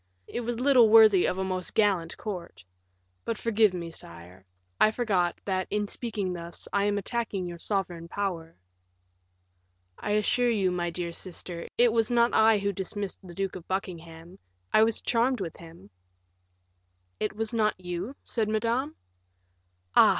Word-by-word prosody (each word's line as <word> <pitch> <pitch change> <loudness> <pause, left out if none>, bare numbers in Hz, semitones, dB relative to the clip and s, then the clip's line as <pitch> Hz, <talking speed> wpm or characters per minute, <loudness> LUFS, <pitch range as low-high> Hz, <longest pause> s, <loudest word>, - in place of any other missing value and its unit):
It - - -5
was 240 0 -3
little 255 -4 +6
worthy 215 -4 +7
of 185 - -1
a 190 - -1
most 185 -1 -4
gallant 190 -6 +2
court; 185 - -7 0.6
but 230 - -2
forgive 220 -2 +3
me, 170 -2 -5
sire; 90 - -11 0.4
I - - +6
forgot, 200 -7 0
that, 185 -2 -1
in 210 0 -1
speaking 205 -5 -3
thus, 170 -1 -7
I 200 0 +2
am 205 0 +1
attacking 205 -2 -2
your 175 -1 -7
sovereign 175 -4 -2
power." 170 -4 -4 1.4
"I 205 - -2
assure 240 +4 +2
you, 200 -5 +2
my 175 -1 -1
dear 170 0 -4
sister, 170 -1 -5
it 240 -1 +5
was 225 -1 +2
not 235 0 +3
I 220 0 +5
who 200 0 0
dismissed 195 +1 -4
the 175 -2 -12
Duke 195 0 -2
of 180 -2 -9
Buckingham; 170 -1 -6 0.3
I 215 - +6
was 225 0 +2
charmed 245 +1 +2
with 170 -5 -5
him." 165 - -14 1.3
"It 215 0 -2
was 220 +1 -3
not 215 -4 +1
you?" 180 +8 -5
said 220 -3 -1
Madame; 235 +7 0 1.0
"ah! - - +8
195 Hz, 155 wpm, -28 LUFS, 175-220 Hz, 1.4 s, ah